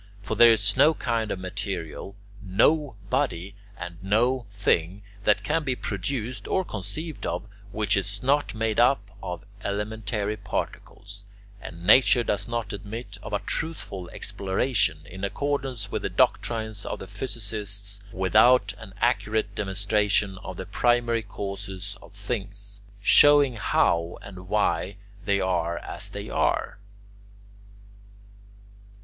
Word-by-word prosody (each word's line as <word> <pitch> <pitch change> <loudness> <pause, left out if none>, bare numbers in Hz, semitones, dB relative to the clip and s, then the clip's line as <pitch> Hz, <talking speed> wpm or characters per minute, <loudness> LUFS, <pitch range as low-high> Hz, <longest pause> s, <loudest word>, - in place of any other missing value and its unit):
For 110 - -3
there 120 +2 +8
is 105 -2 +3
no 150 +4 +5
kind 115 -5 -1
of 100 - -2
material, 95 0 -5 0.3
no 130 +8 +2 0.2
body, 100 -9 0 0.2
and 85 0 -8
no 120 +5 +2
thing 100 -1 0 0.2
that 105 - +4
can 160 +1 +1
be 130 -3 0
produced 115 +4 -3
or 190 - +1
conceived 130 - -5
of, 90 +3 -2 0.3
which 105 0 +1
is 100 +2 -2
not 140 -1 +2
made 110 0 0
up 120 -5 +3
of 90 +1 -5 0.2
elementary 105 0 -2
particles; 100 0 -5 0.4
and 85 0 -9
nature 120 +3 +6
does 105 - 0
not 120 -2 -3
admit 105 0 -7
of - - -8
a 105 - 0
truthful 100 - -4
exploration 100 -3 0
in 95 +4 -9
accordance 130 -2 -2
with - - -2
the - - -2
doctrines 110 -3 +1
of - - -4
the - - -8
physicists 100 -2 -4
without 110 +7 +4
an 95 - -11
accurate 110 -3 +1
demonstration 100 0 0
of 95 -2 -8
the 95 - -5
primary 120 +3 +2
causes 100 -1 -6
of - - -15
things, 100 -1 -5 0.2
showing 145 +2 +7
how 85 -4 +1
and 95 -2 -10
why 100 -2 +1 0.3
they 100 -1 +2
are 85 -3 0
as - - -5
they - - -6
are. - - 0
105 Hz, 130 wpm, -26 LUFS, 100-120 Hz, 0.4 s, there